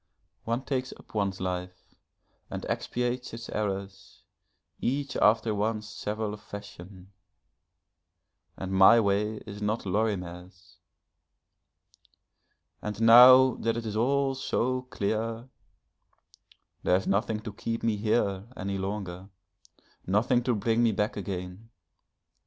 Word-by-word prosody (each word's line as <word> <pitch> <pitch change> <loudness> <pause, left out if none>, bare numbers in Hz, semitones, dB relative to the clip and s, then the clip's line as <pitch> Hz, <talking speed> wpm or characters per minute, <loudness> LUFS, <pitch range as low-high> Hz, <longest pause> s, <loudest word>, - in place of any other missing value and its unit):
One 115 +3 -1
takes 130 -1 -2
up - - -19
one's 100 -3 -1
life 90 0 -5 0.6
and - - -5
expiates 125 -1 -2
its 115 0 -9
errors, 100 -2 -5 0.6
each 135 +2 -2
after 110 +1 +3
one's 105 +1 -1
several 105 0 -4
fashion 100 -2 -11 1.5
and 95 0 -5
my 95 +5 +7
way 105 +1 0
is 105 -1 -9
not 105 +2 -1
Lorimer's. 95 -2 -3 2.0
And 105 -1 -5
now 125 +3 +8
that 115 0 -1
it 115 - -4
is 105 -1 -4
all 135 +4 +1
so 130 -1 -1
clear, 115 +3 -2 1.3
there 90 - +3
is 95 - 0
nothing 105 +2 0
to 110 -2 -7
keep 115 +2 -4
me 115 -2 +1
here 100 -2 0
any 95 +1 -3
longer, 95 -1 -5 0.8
nothing 115 +6 +2
to 125 - +2
bring 115 +2 +1
me 115 -2 +3
back 105 +2 -1
again. 95 +1 -6
105 Hz, 115 wpm, -28 LUFS, 95-115 Hz, 2.0 s, now